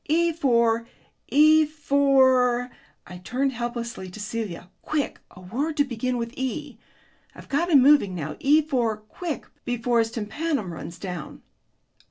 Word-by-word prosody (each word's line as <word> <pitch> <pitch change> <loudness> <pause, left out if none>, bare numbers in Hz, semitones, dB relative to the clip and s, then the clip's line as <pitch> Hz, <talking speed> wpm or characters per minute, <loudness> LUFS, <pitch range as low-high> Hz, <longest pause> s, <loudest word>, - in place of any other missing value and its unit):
E 335 +2 +2
for 235 -6 +2 0.4
E 310 +2 +6
for 265 -5 +3 0.2
" - - -38
I 180 - -9
turned 255 +9 -1
helplessly 235 -5 -5
to 180 - -11
Celia: 205 -5 -5
"quick, 305 -2 -2
a 180 - -15
word 275 - -3
to 285 - +5
begin 255 -1 -2
with 230 0 -4
E! 265 -1 -4 0.6
I've - - -13
got 335 +6 0
him 280 -6 +6
moving 275 -10 +5
now. 155 -3 -4
E 300 +3 +4
for 245 -7 0
quick, 290 +10 -6 0.2
before 245 -1 0
his 225 0 +1
tympanum 225 - -3
runs 170 +1 -8
down." 180 -4 -7
245 Hz, 150 wpm, -25 LUFS, 220-290 Hz, 0.6 s, E